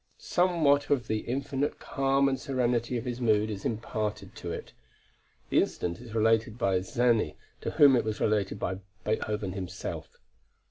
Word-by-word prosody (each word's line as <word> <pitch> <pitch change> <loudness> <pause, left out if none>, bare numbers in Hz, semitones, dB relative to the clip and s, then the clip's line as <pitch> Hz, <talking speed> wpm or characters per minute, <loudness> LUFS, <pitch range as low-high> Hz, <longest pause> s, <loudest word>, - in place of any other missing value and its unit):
Somewhat 155 -6 +2
of 130 -4 +2
the 110 -1 -1
infinite 140 +4 -2
calm 135 0 +1
and 135 -1 0
serenity 125 -3 0
of 115 - -5
his 125 0 -4
mood 110 -2 +3
is 100 -2 -6
imparted 105 -3 -3
to 85 - -5
it. - - -7 0.8
The - - +5
incident 85 0 -2
is 115 -2 -9
related 110 0 +2
by 95 -5 +2
Czerny 115 - +1 0.3
to - - -2
whom 140 -3 +6
it 120 - +2
was 110 -1 -3
related 105 -3 +1
by 95 +1 -3 0.3
Beethoven 105 -2 -1
himself. 95 -1 -6
115 Hz, 155 wpm, -29 LUFS, 105-135 Hz, 0.8 s, whom